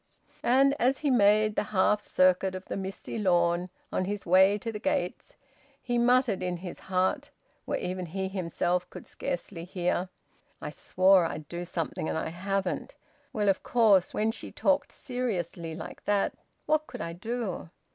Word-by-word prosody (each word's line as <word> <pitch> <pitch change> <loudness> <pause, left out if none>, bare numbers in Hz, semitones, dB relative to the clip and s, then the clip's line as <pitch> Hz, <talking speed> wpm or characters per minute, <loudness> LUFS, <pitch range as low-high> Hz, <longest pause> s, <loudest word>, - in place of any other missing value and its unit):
And 270 +3 +4
as 260 +2 +3
he 285 - +4
made 215 -2 +4
the - - 0
half 210 +1 +3
circuit 185 -1 +2
of 185 - -7
the - - -4
misty 195 +3 -5
lawn, 175 -2 +2 0.2
on 185 - 0
his 205 +1 -4
way 190 +3 +5
to 230 +2 -4
the 210 - -6
gates, 180 -3 -2 0.5
he 245 -3 -1
muttered 245 -4 +3
in 180 -1 -2
his 175 0 -8
heart, 190 +11 0 0.4
where - - -1
even 180 0 -4
he 190 +3 -3
himself 180 -1 -1
could - - -10
scarcely 175 -1 -5
hear: 180 0 -1 0.5
"I - - -5
swore 185 -1 +4
I'd 155 -2 -7
do 175 +2 -5
something, 165 -2 -3
and - - -1
I - - -2
haven't. 190 +2 -2 0.4
Well, 210 -1 -1
of 195 -1 +3
course, 210 -6 +4
when 215 +1 +1
she 225 - -5
talked 285 0 +1
seriously 180 - -3
like 160 - -9
that, 205 -1 +1 0.3
what 310 0 +1
could 250 - -7
I 170 - -4
do?" 215 -1 -4
190 Hz, 165 wpm, -28 LUFS, 180-220 Hz, 0.5 s, way